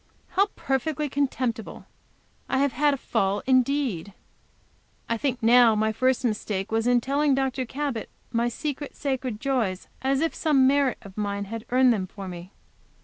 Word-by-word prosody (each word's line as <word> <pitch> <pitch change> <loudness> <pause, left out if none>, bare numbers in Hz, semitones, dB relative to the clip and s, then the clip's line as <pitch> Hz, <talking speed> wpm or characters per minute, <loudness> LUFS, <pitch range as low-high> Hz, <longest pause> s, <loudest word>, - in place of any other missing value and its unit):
How 395 +2 +2
perfectly 280 +2 -1
contemptible! 255 -5 -2 0.6
I 265 - +1
have 280 0 +2
had 290 +3 +2
a - - -7
fall 205 -5 -1
indeed! 255 - +1 0.9
I 230 - 0
think 250 0 -2
now 235 -1 +6
my 215 +1 +1
first 255 +3 +1
mistake 210 -3 -2
was 225 +1 +1
in 245 -1 +4
telling 280 +2 +2
Dr. 265 -1 -1
Cabot 270 -3 -3 0.2
my 235 +1 +1
secret, 290 +2 -5
sacred 260 -5 -3
joys, 240 -9 -1
as 270 +1 +1
if 325 - 0
some 290 -5 +3
merit 275 -1 +3
of 195 0 -13
mine 200 -1 -2
had 225 +3 -6
earned 255 0 +5
them 190 -4 -2
for 195 0 -8
me. 175 +1 -8
250 Hz, 160 wpm, -25 LUFS, 220-275 Hz, 0.9 s, now